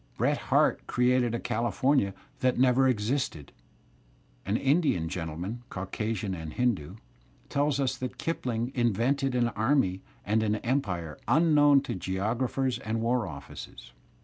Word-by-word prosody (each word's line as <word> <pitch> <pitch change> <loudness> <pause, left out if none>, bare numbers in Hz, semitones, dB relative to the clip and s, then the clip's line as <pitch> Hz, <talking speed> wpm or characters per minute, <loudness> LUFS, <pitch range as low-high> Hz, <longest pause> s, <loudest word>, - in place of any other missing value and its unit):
Bret - - +2
Harte - - +3
created 125 -1 +2
a - - -2
California 120 -2 +1 0.2
that 130 -1 +1
never 130 +1 +4
existed, 115 - -1 1.0
and 100 +3 +1
Indian 135 - +2
gentlemen, 90 +6 -4
Caucasian 100 +1 -3
and 80 -3 -6
Hindoo, 115 -12 0 0.5
tell 145 +1 +1
us 135 -3 0
that 125 -1 -5
Kipling 125 -7 -2
invented 125 +3 +1
an 120 -1 +2
army 110 -5 +1 0.2
and 110 +2 +2
an 105 -1 +1
empire 100 - -2
unknown 145 0 +5
to - - -4
geographers 115 +8 -1
and 110 +1 -2
war 115 -1 +1
offices. 70 -4 -10
120 Hz, 125 wpm, -28 LUFS, 100-130 Hz, 1.0 s, unknown